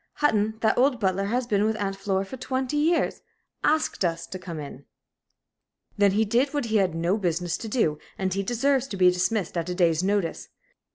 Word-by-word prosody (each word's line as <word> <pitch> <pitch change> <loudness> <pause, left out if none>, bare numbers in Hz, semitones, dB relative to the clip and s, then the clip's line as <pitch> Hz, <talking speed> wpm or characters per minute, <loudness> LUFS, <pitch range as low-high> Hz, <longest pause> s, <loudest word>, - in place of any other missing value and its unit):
Hutton 220 -6 +1
that 220 +1 +2
old 260 -1 +3
butler 195 -1 0
that - - -3
has 250 +2 0
been 205 -3 +1
with 220 +1 +1
Aunt 195 -1 -2
Flora 195 0 -1
for 230 - -8
twenty 260 +2 -2
years 320 +3 +1 0.4
asked 310 -8 +1
us 165 -2 -1
to 185 - -7
come 170 -3 -7
in." 140 -2 -9 1.1
"Then 200 -1 +3
he 220 +2 +2
did 250 +7 +1
what 290 - 0
he 220 -1 +1
had 185 -5 +1
no 170 +5 +1
business 175 -2 -1
to 225 - -7
do, 185 -10 0 0.2
and 190 -1 -1
he 195 - 0
deserves 260 +5 +1
to 200 - -6
be 180 -1 +6
dismissed 185 +1 -1
at 170 0 -2
a 180 - -2
day's 170 -3 +2
notice. 195 -3 -1
200 Hz, 210 wpm, -25 LUFS, 180-240 Hz, 1.1 s, be